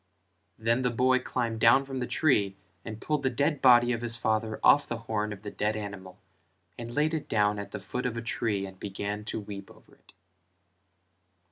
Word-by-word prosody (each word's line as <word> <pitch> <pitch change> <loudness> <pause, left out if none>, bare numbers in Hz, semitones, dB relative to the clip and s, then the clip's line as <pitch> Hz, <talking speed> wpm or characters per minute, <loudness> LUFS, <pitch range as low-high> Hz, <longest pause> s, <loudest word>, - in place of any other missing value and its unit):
Then 115 +3 +1
the 125 - +1
boy 130 +2 +3
climbed 120 -3 -2
down 125 +4 +5
from 135 -1 -5
the 125 - -2
tree 105 -11 +2 0.3
and 110 -1 -7
pulled 150 +2 -1
the 130 - +1
dead 140 +4 0
body 120 -1 +6
of 115 - -3
his 120 -1 0
father 110 -1 -1
off 145 0 +6
the 120 - -3
horn 105 -1 -1
of 105 -1 -8
the 105 - -6
dead 105 +1 -1
animal 100 -3 -7 0.6
and 120 0 -7
laid 150 +5 +1
it 160 - -3
down 105 -1 +2
at 100 - -6
the - - -6
foot 125 0 -3
of 115 -1 -4
a - - -2
tree 110 -4 -1
and 95 -1 -11
began 100 +1 -4
to 110 - -3
weep 100 -2 -8
over - - -19
it. - - -21
115 Hz, 205 wpm, -28 LUFS, 105-125 Hz, 0.6 s, body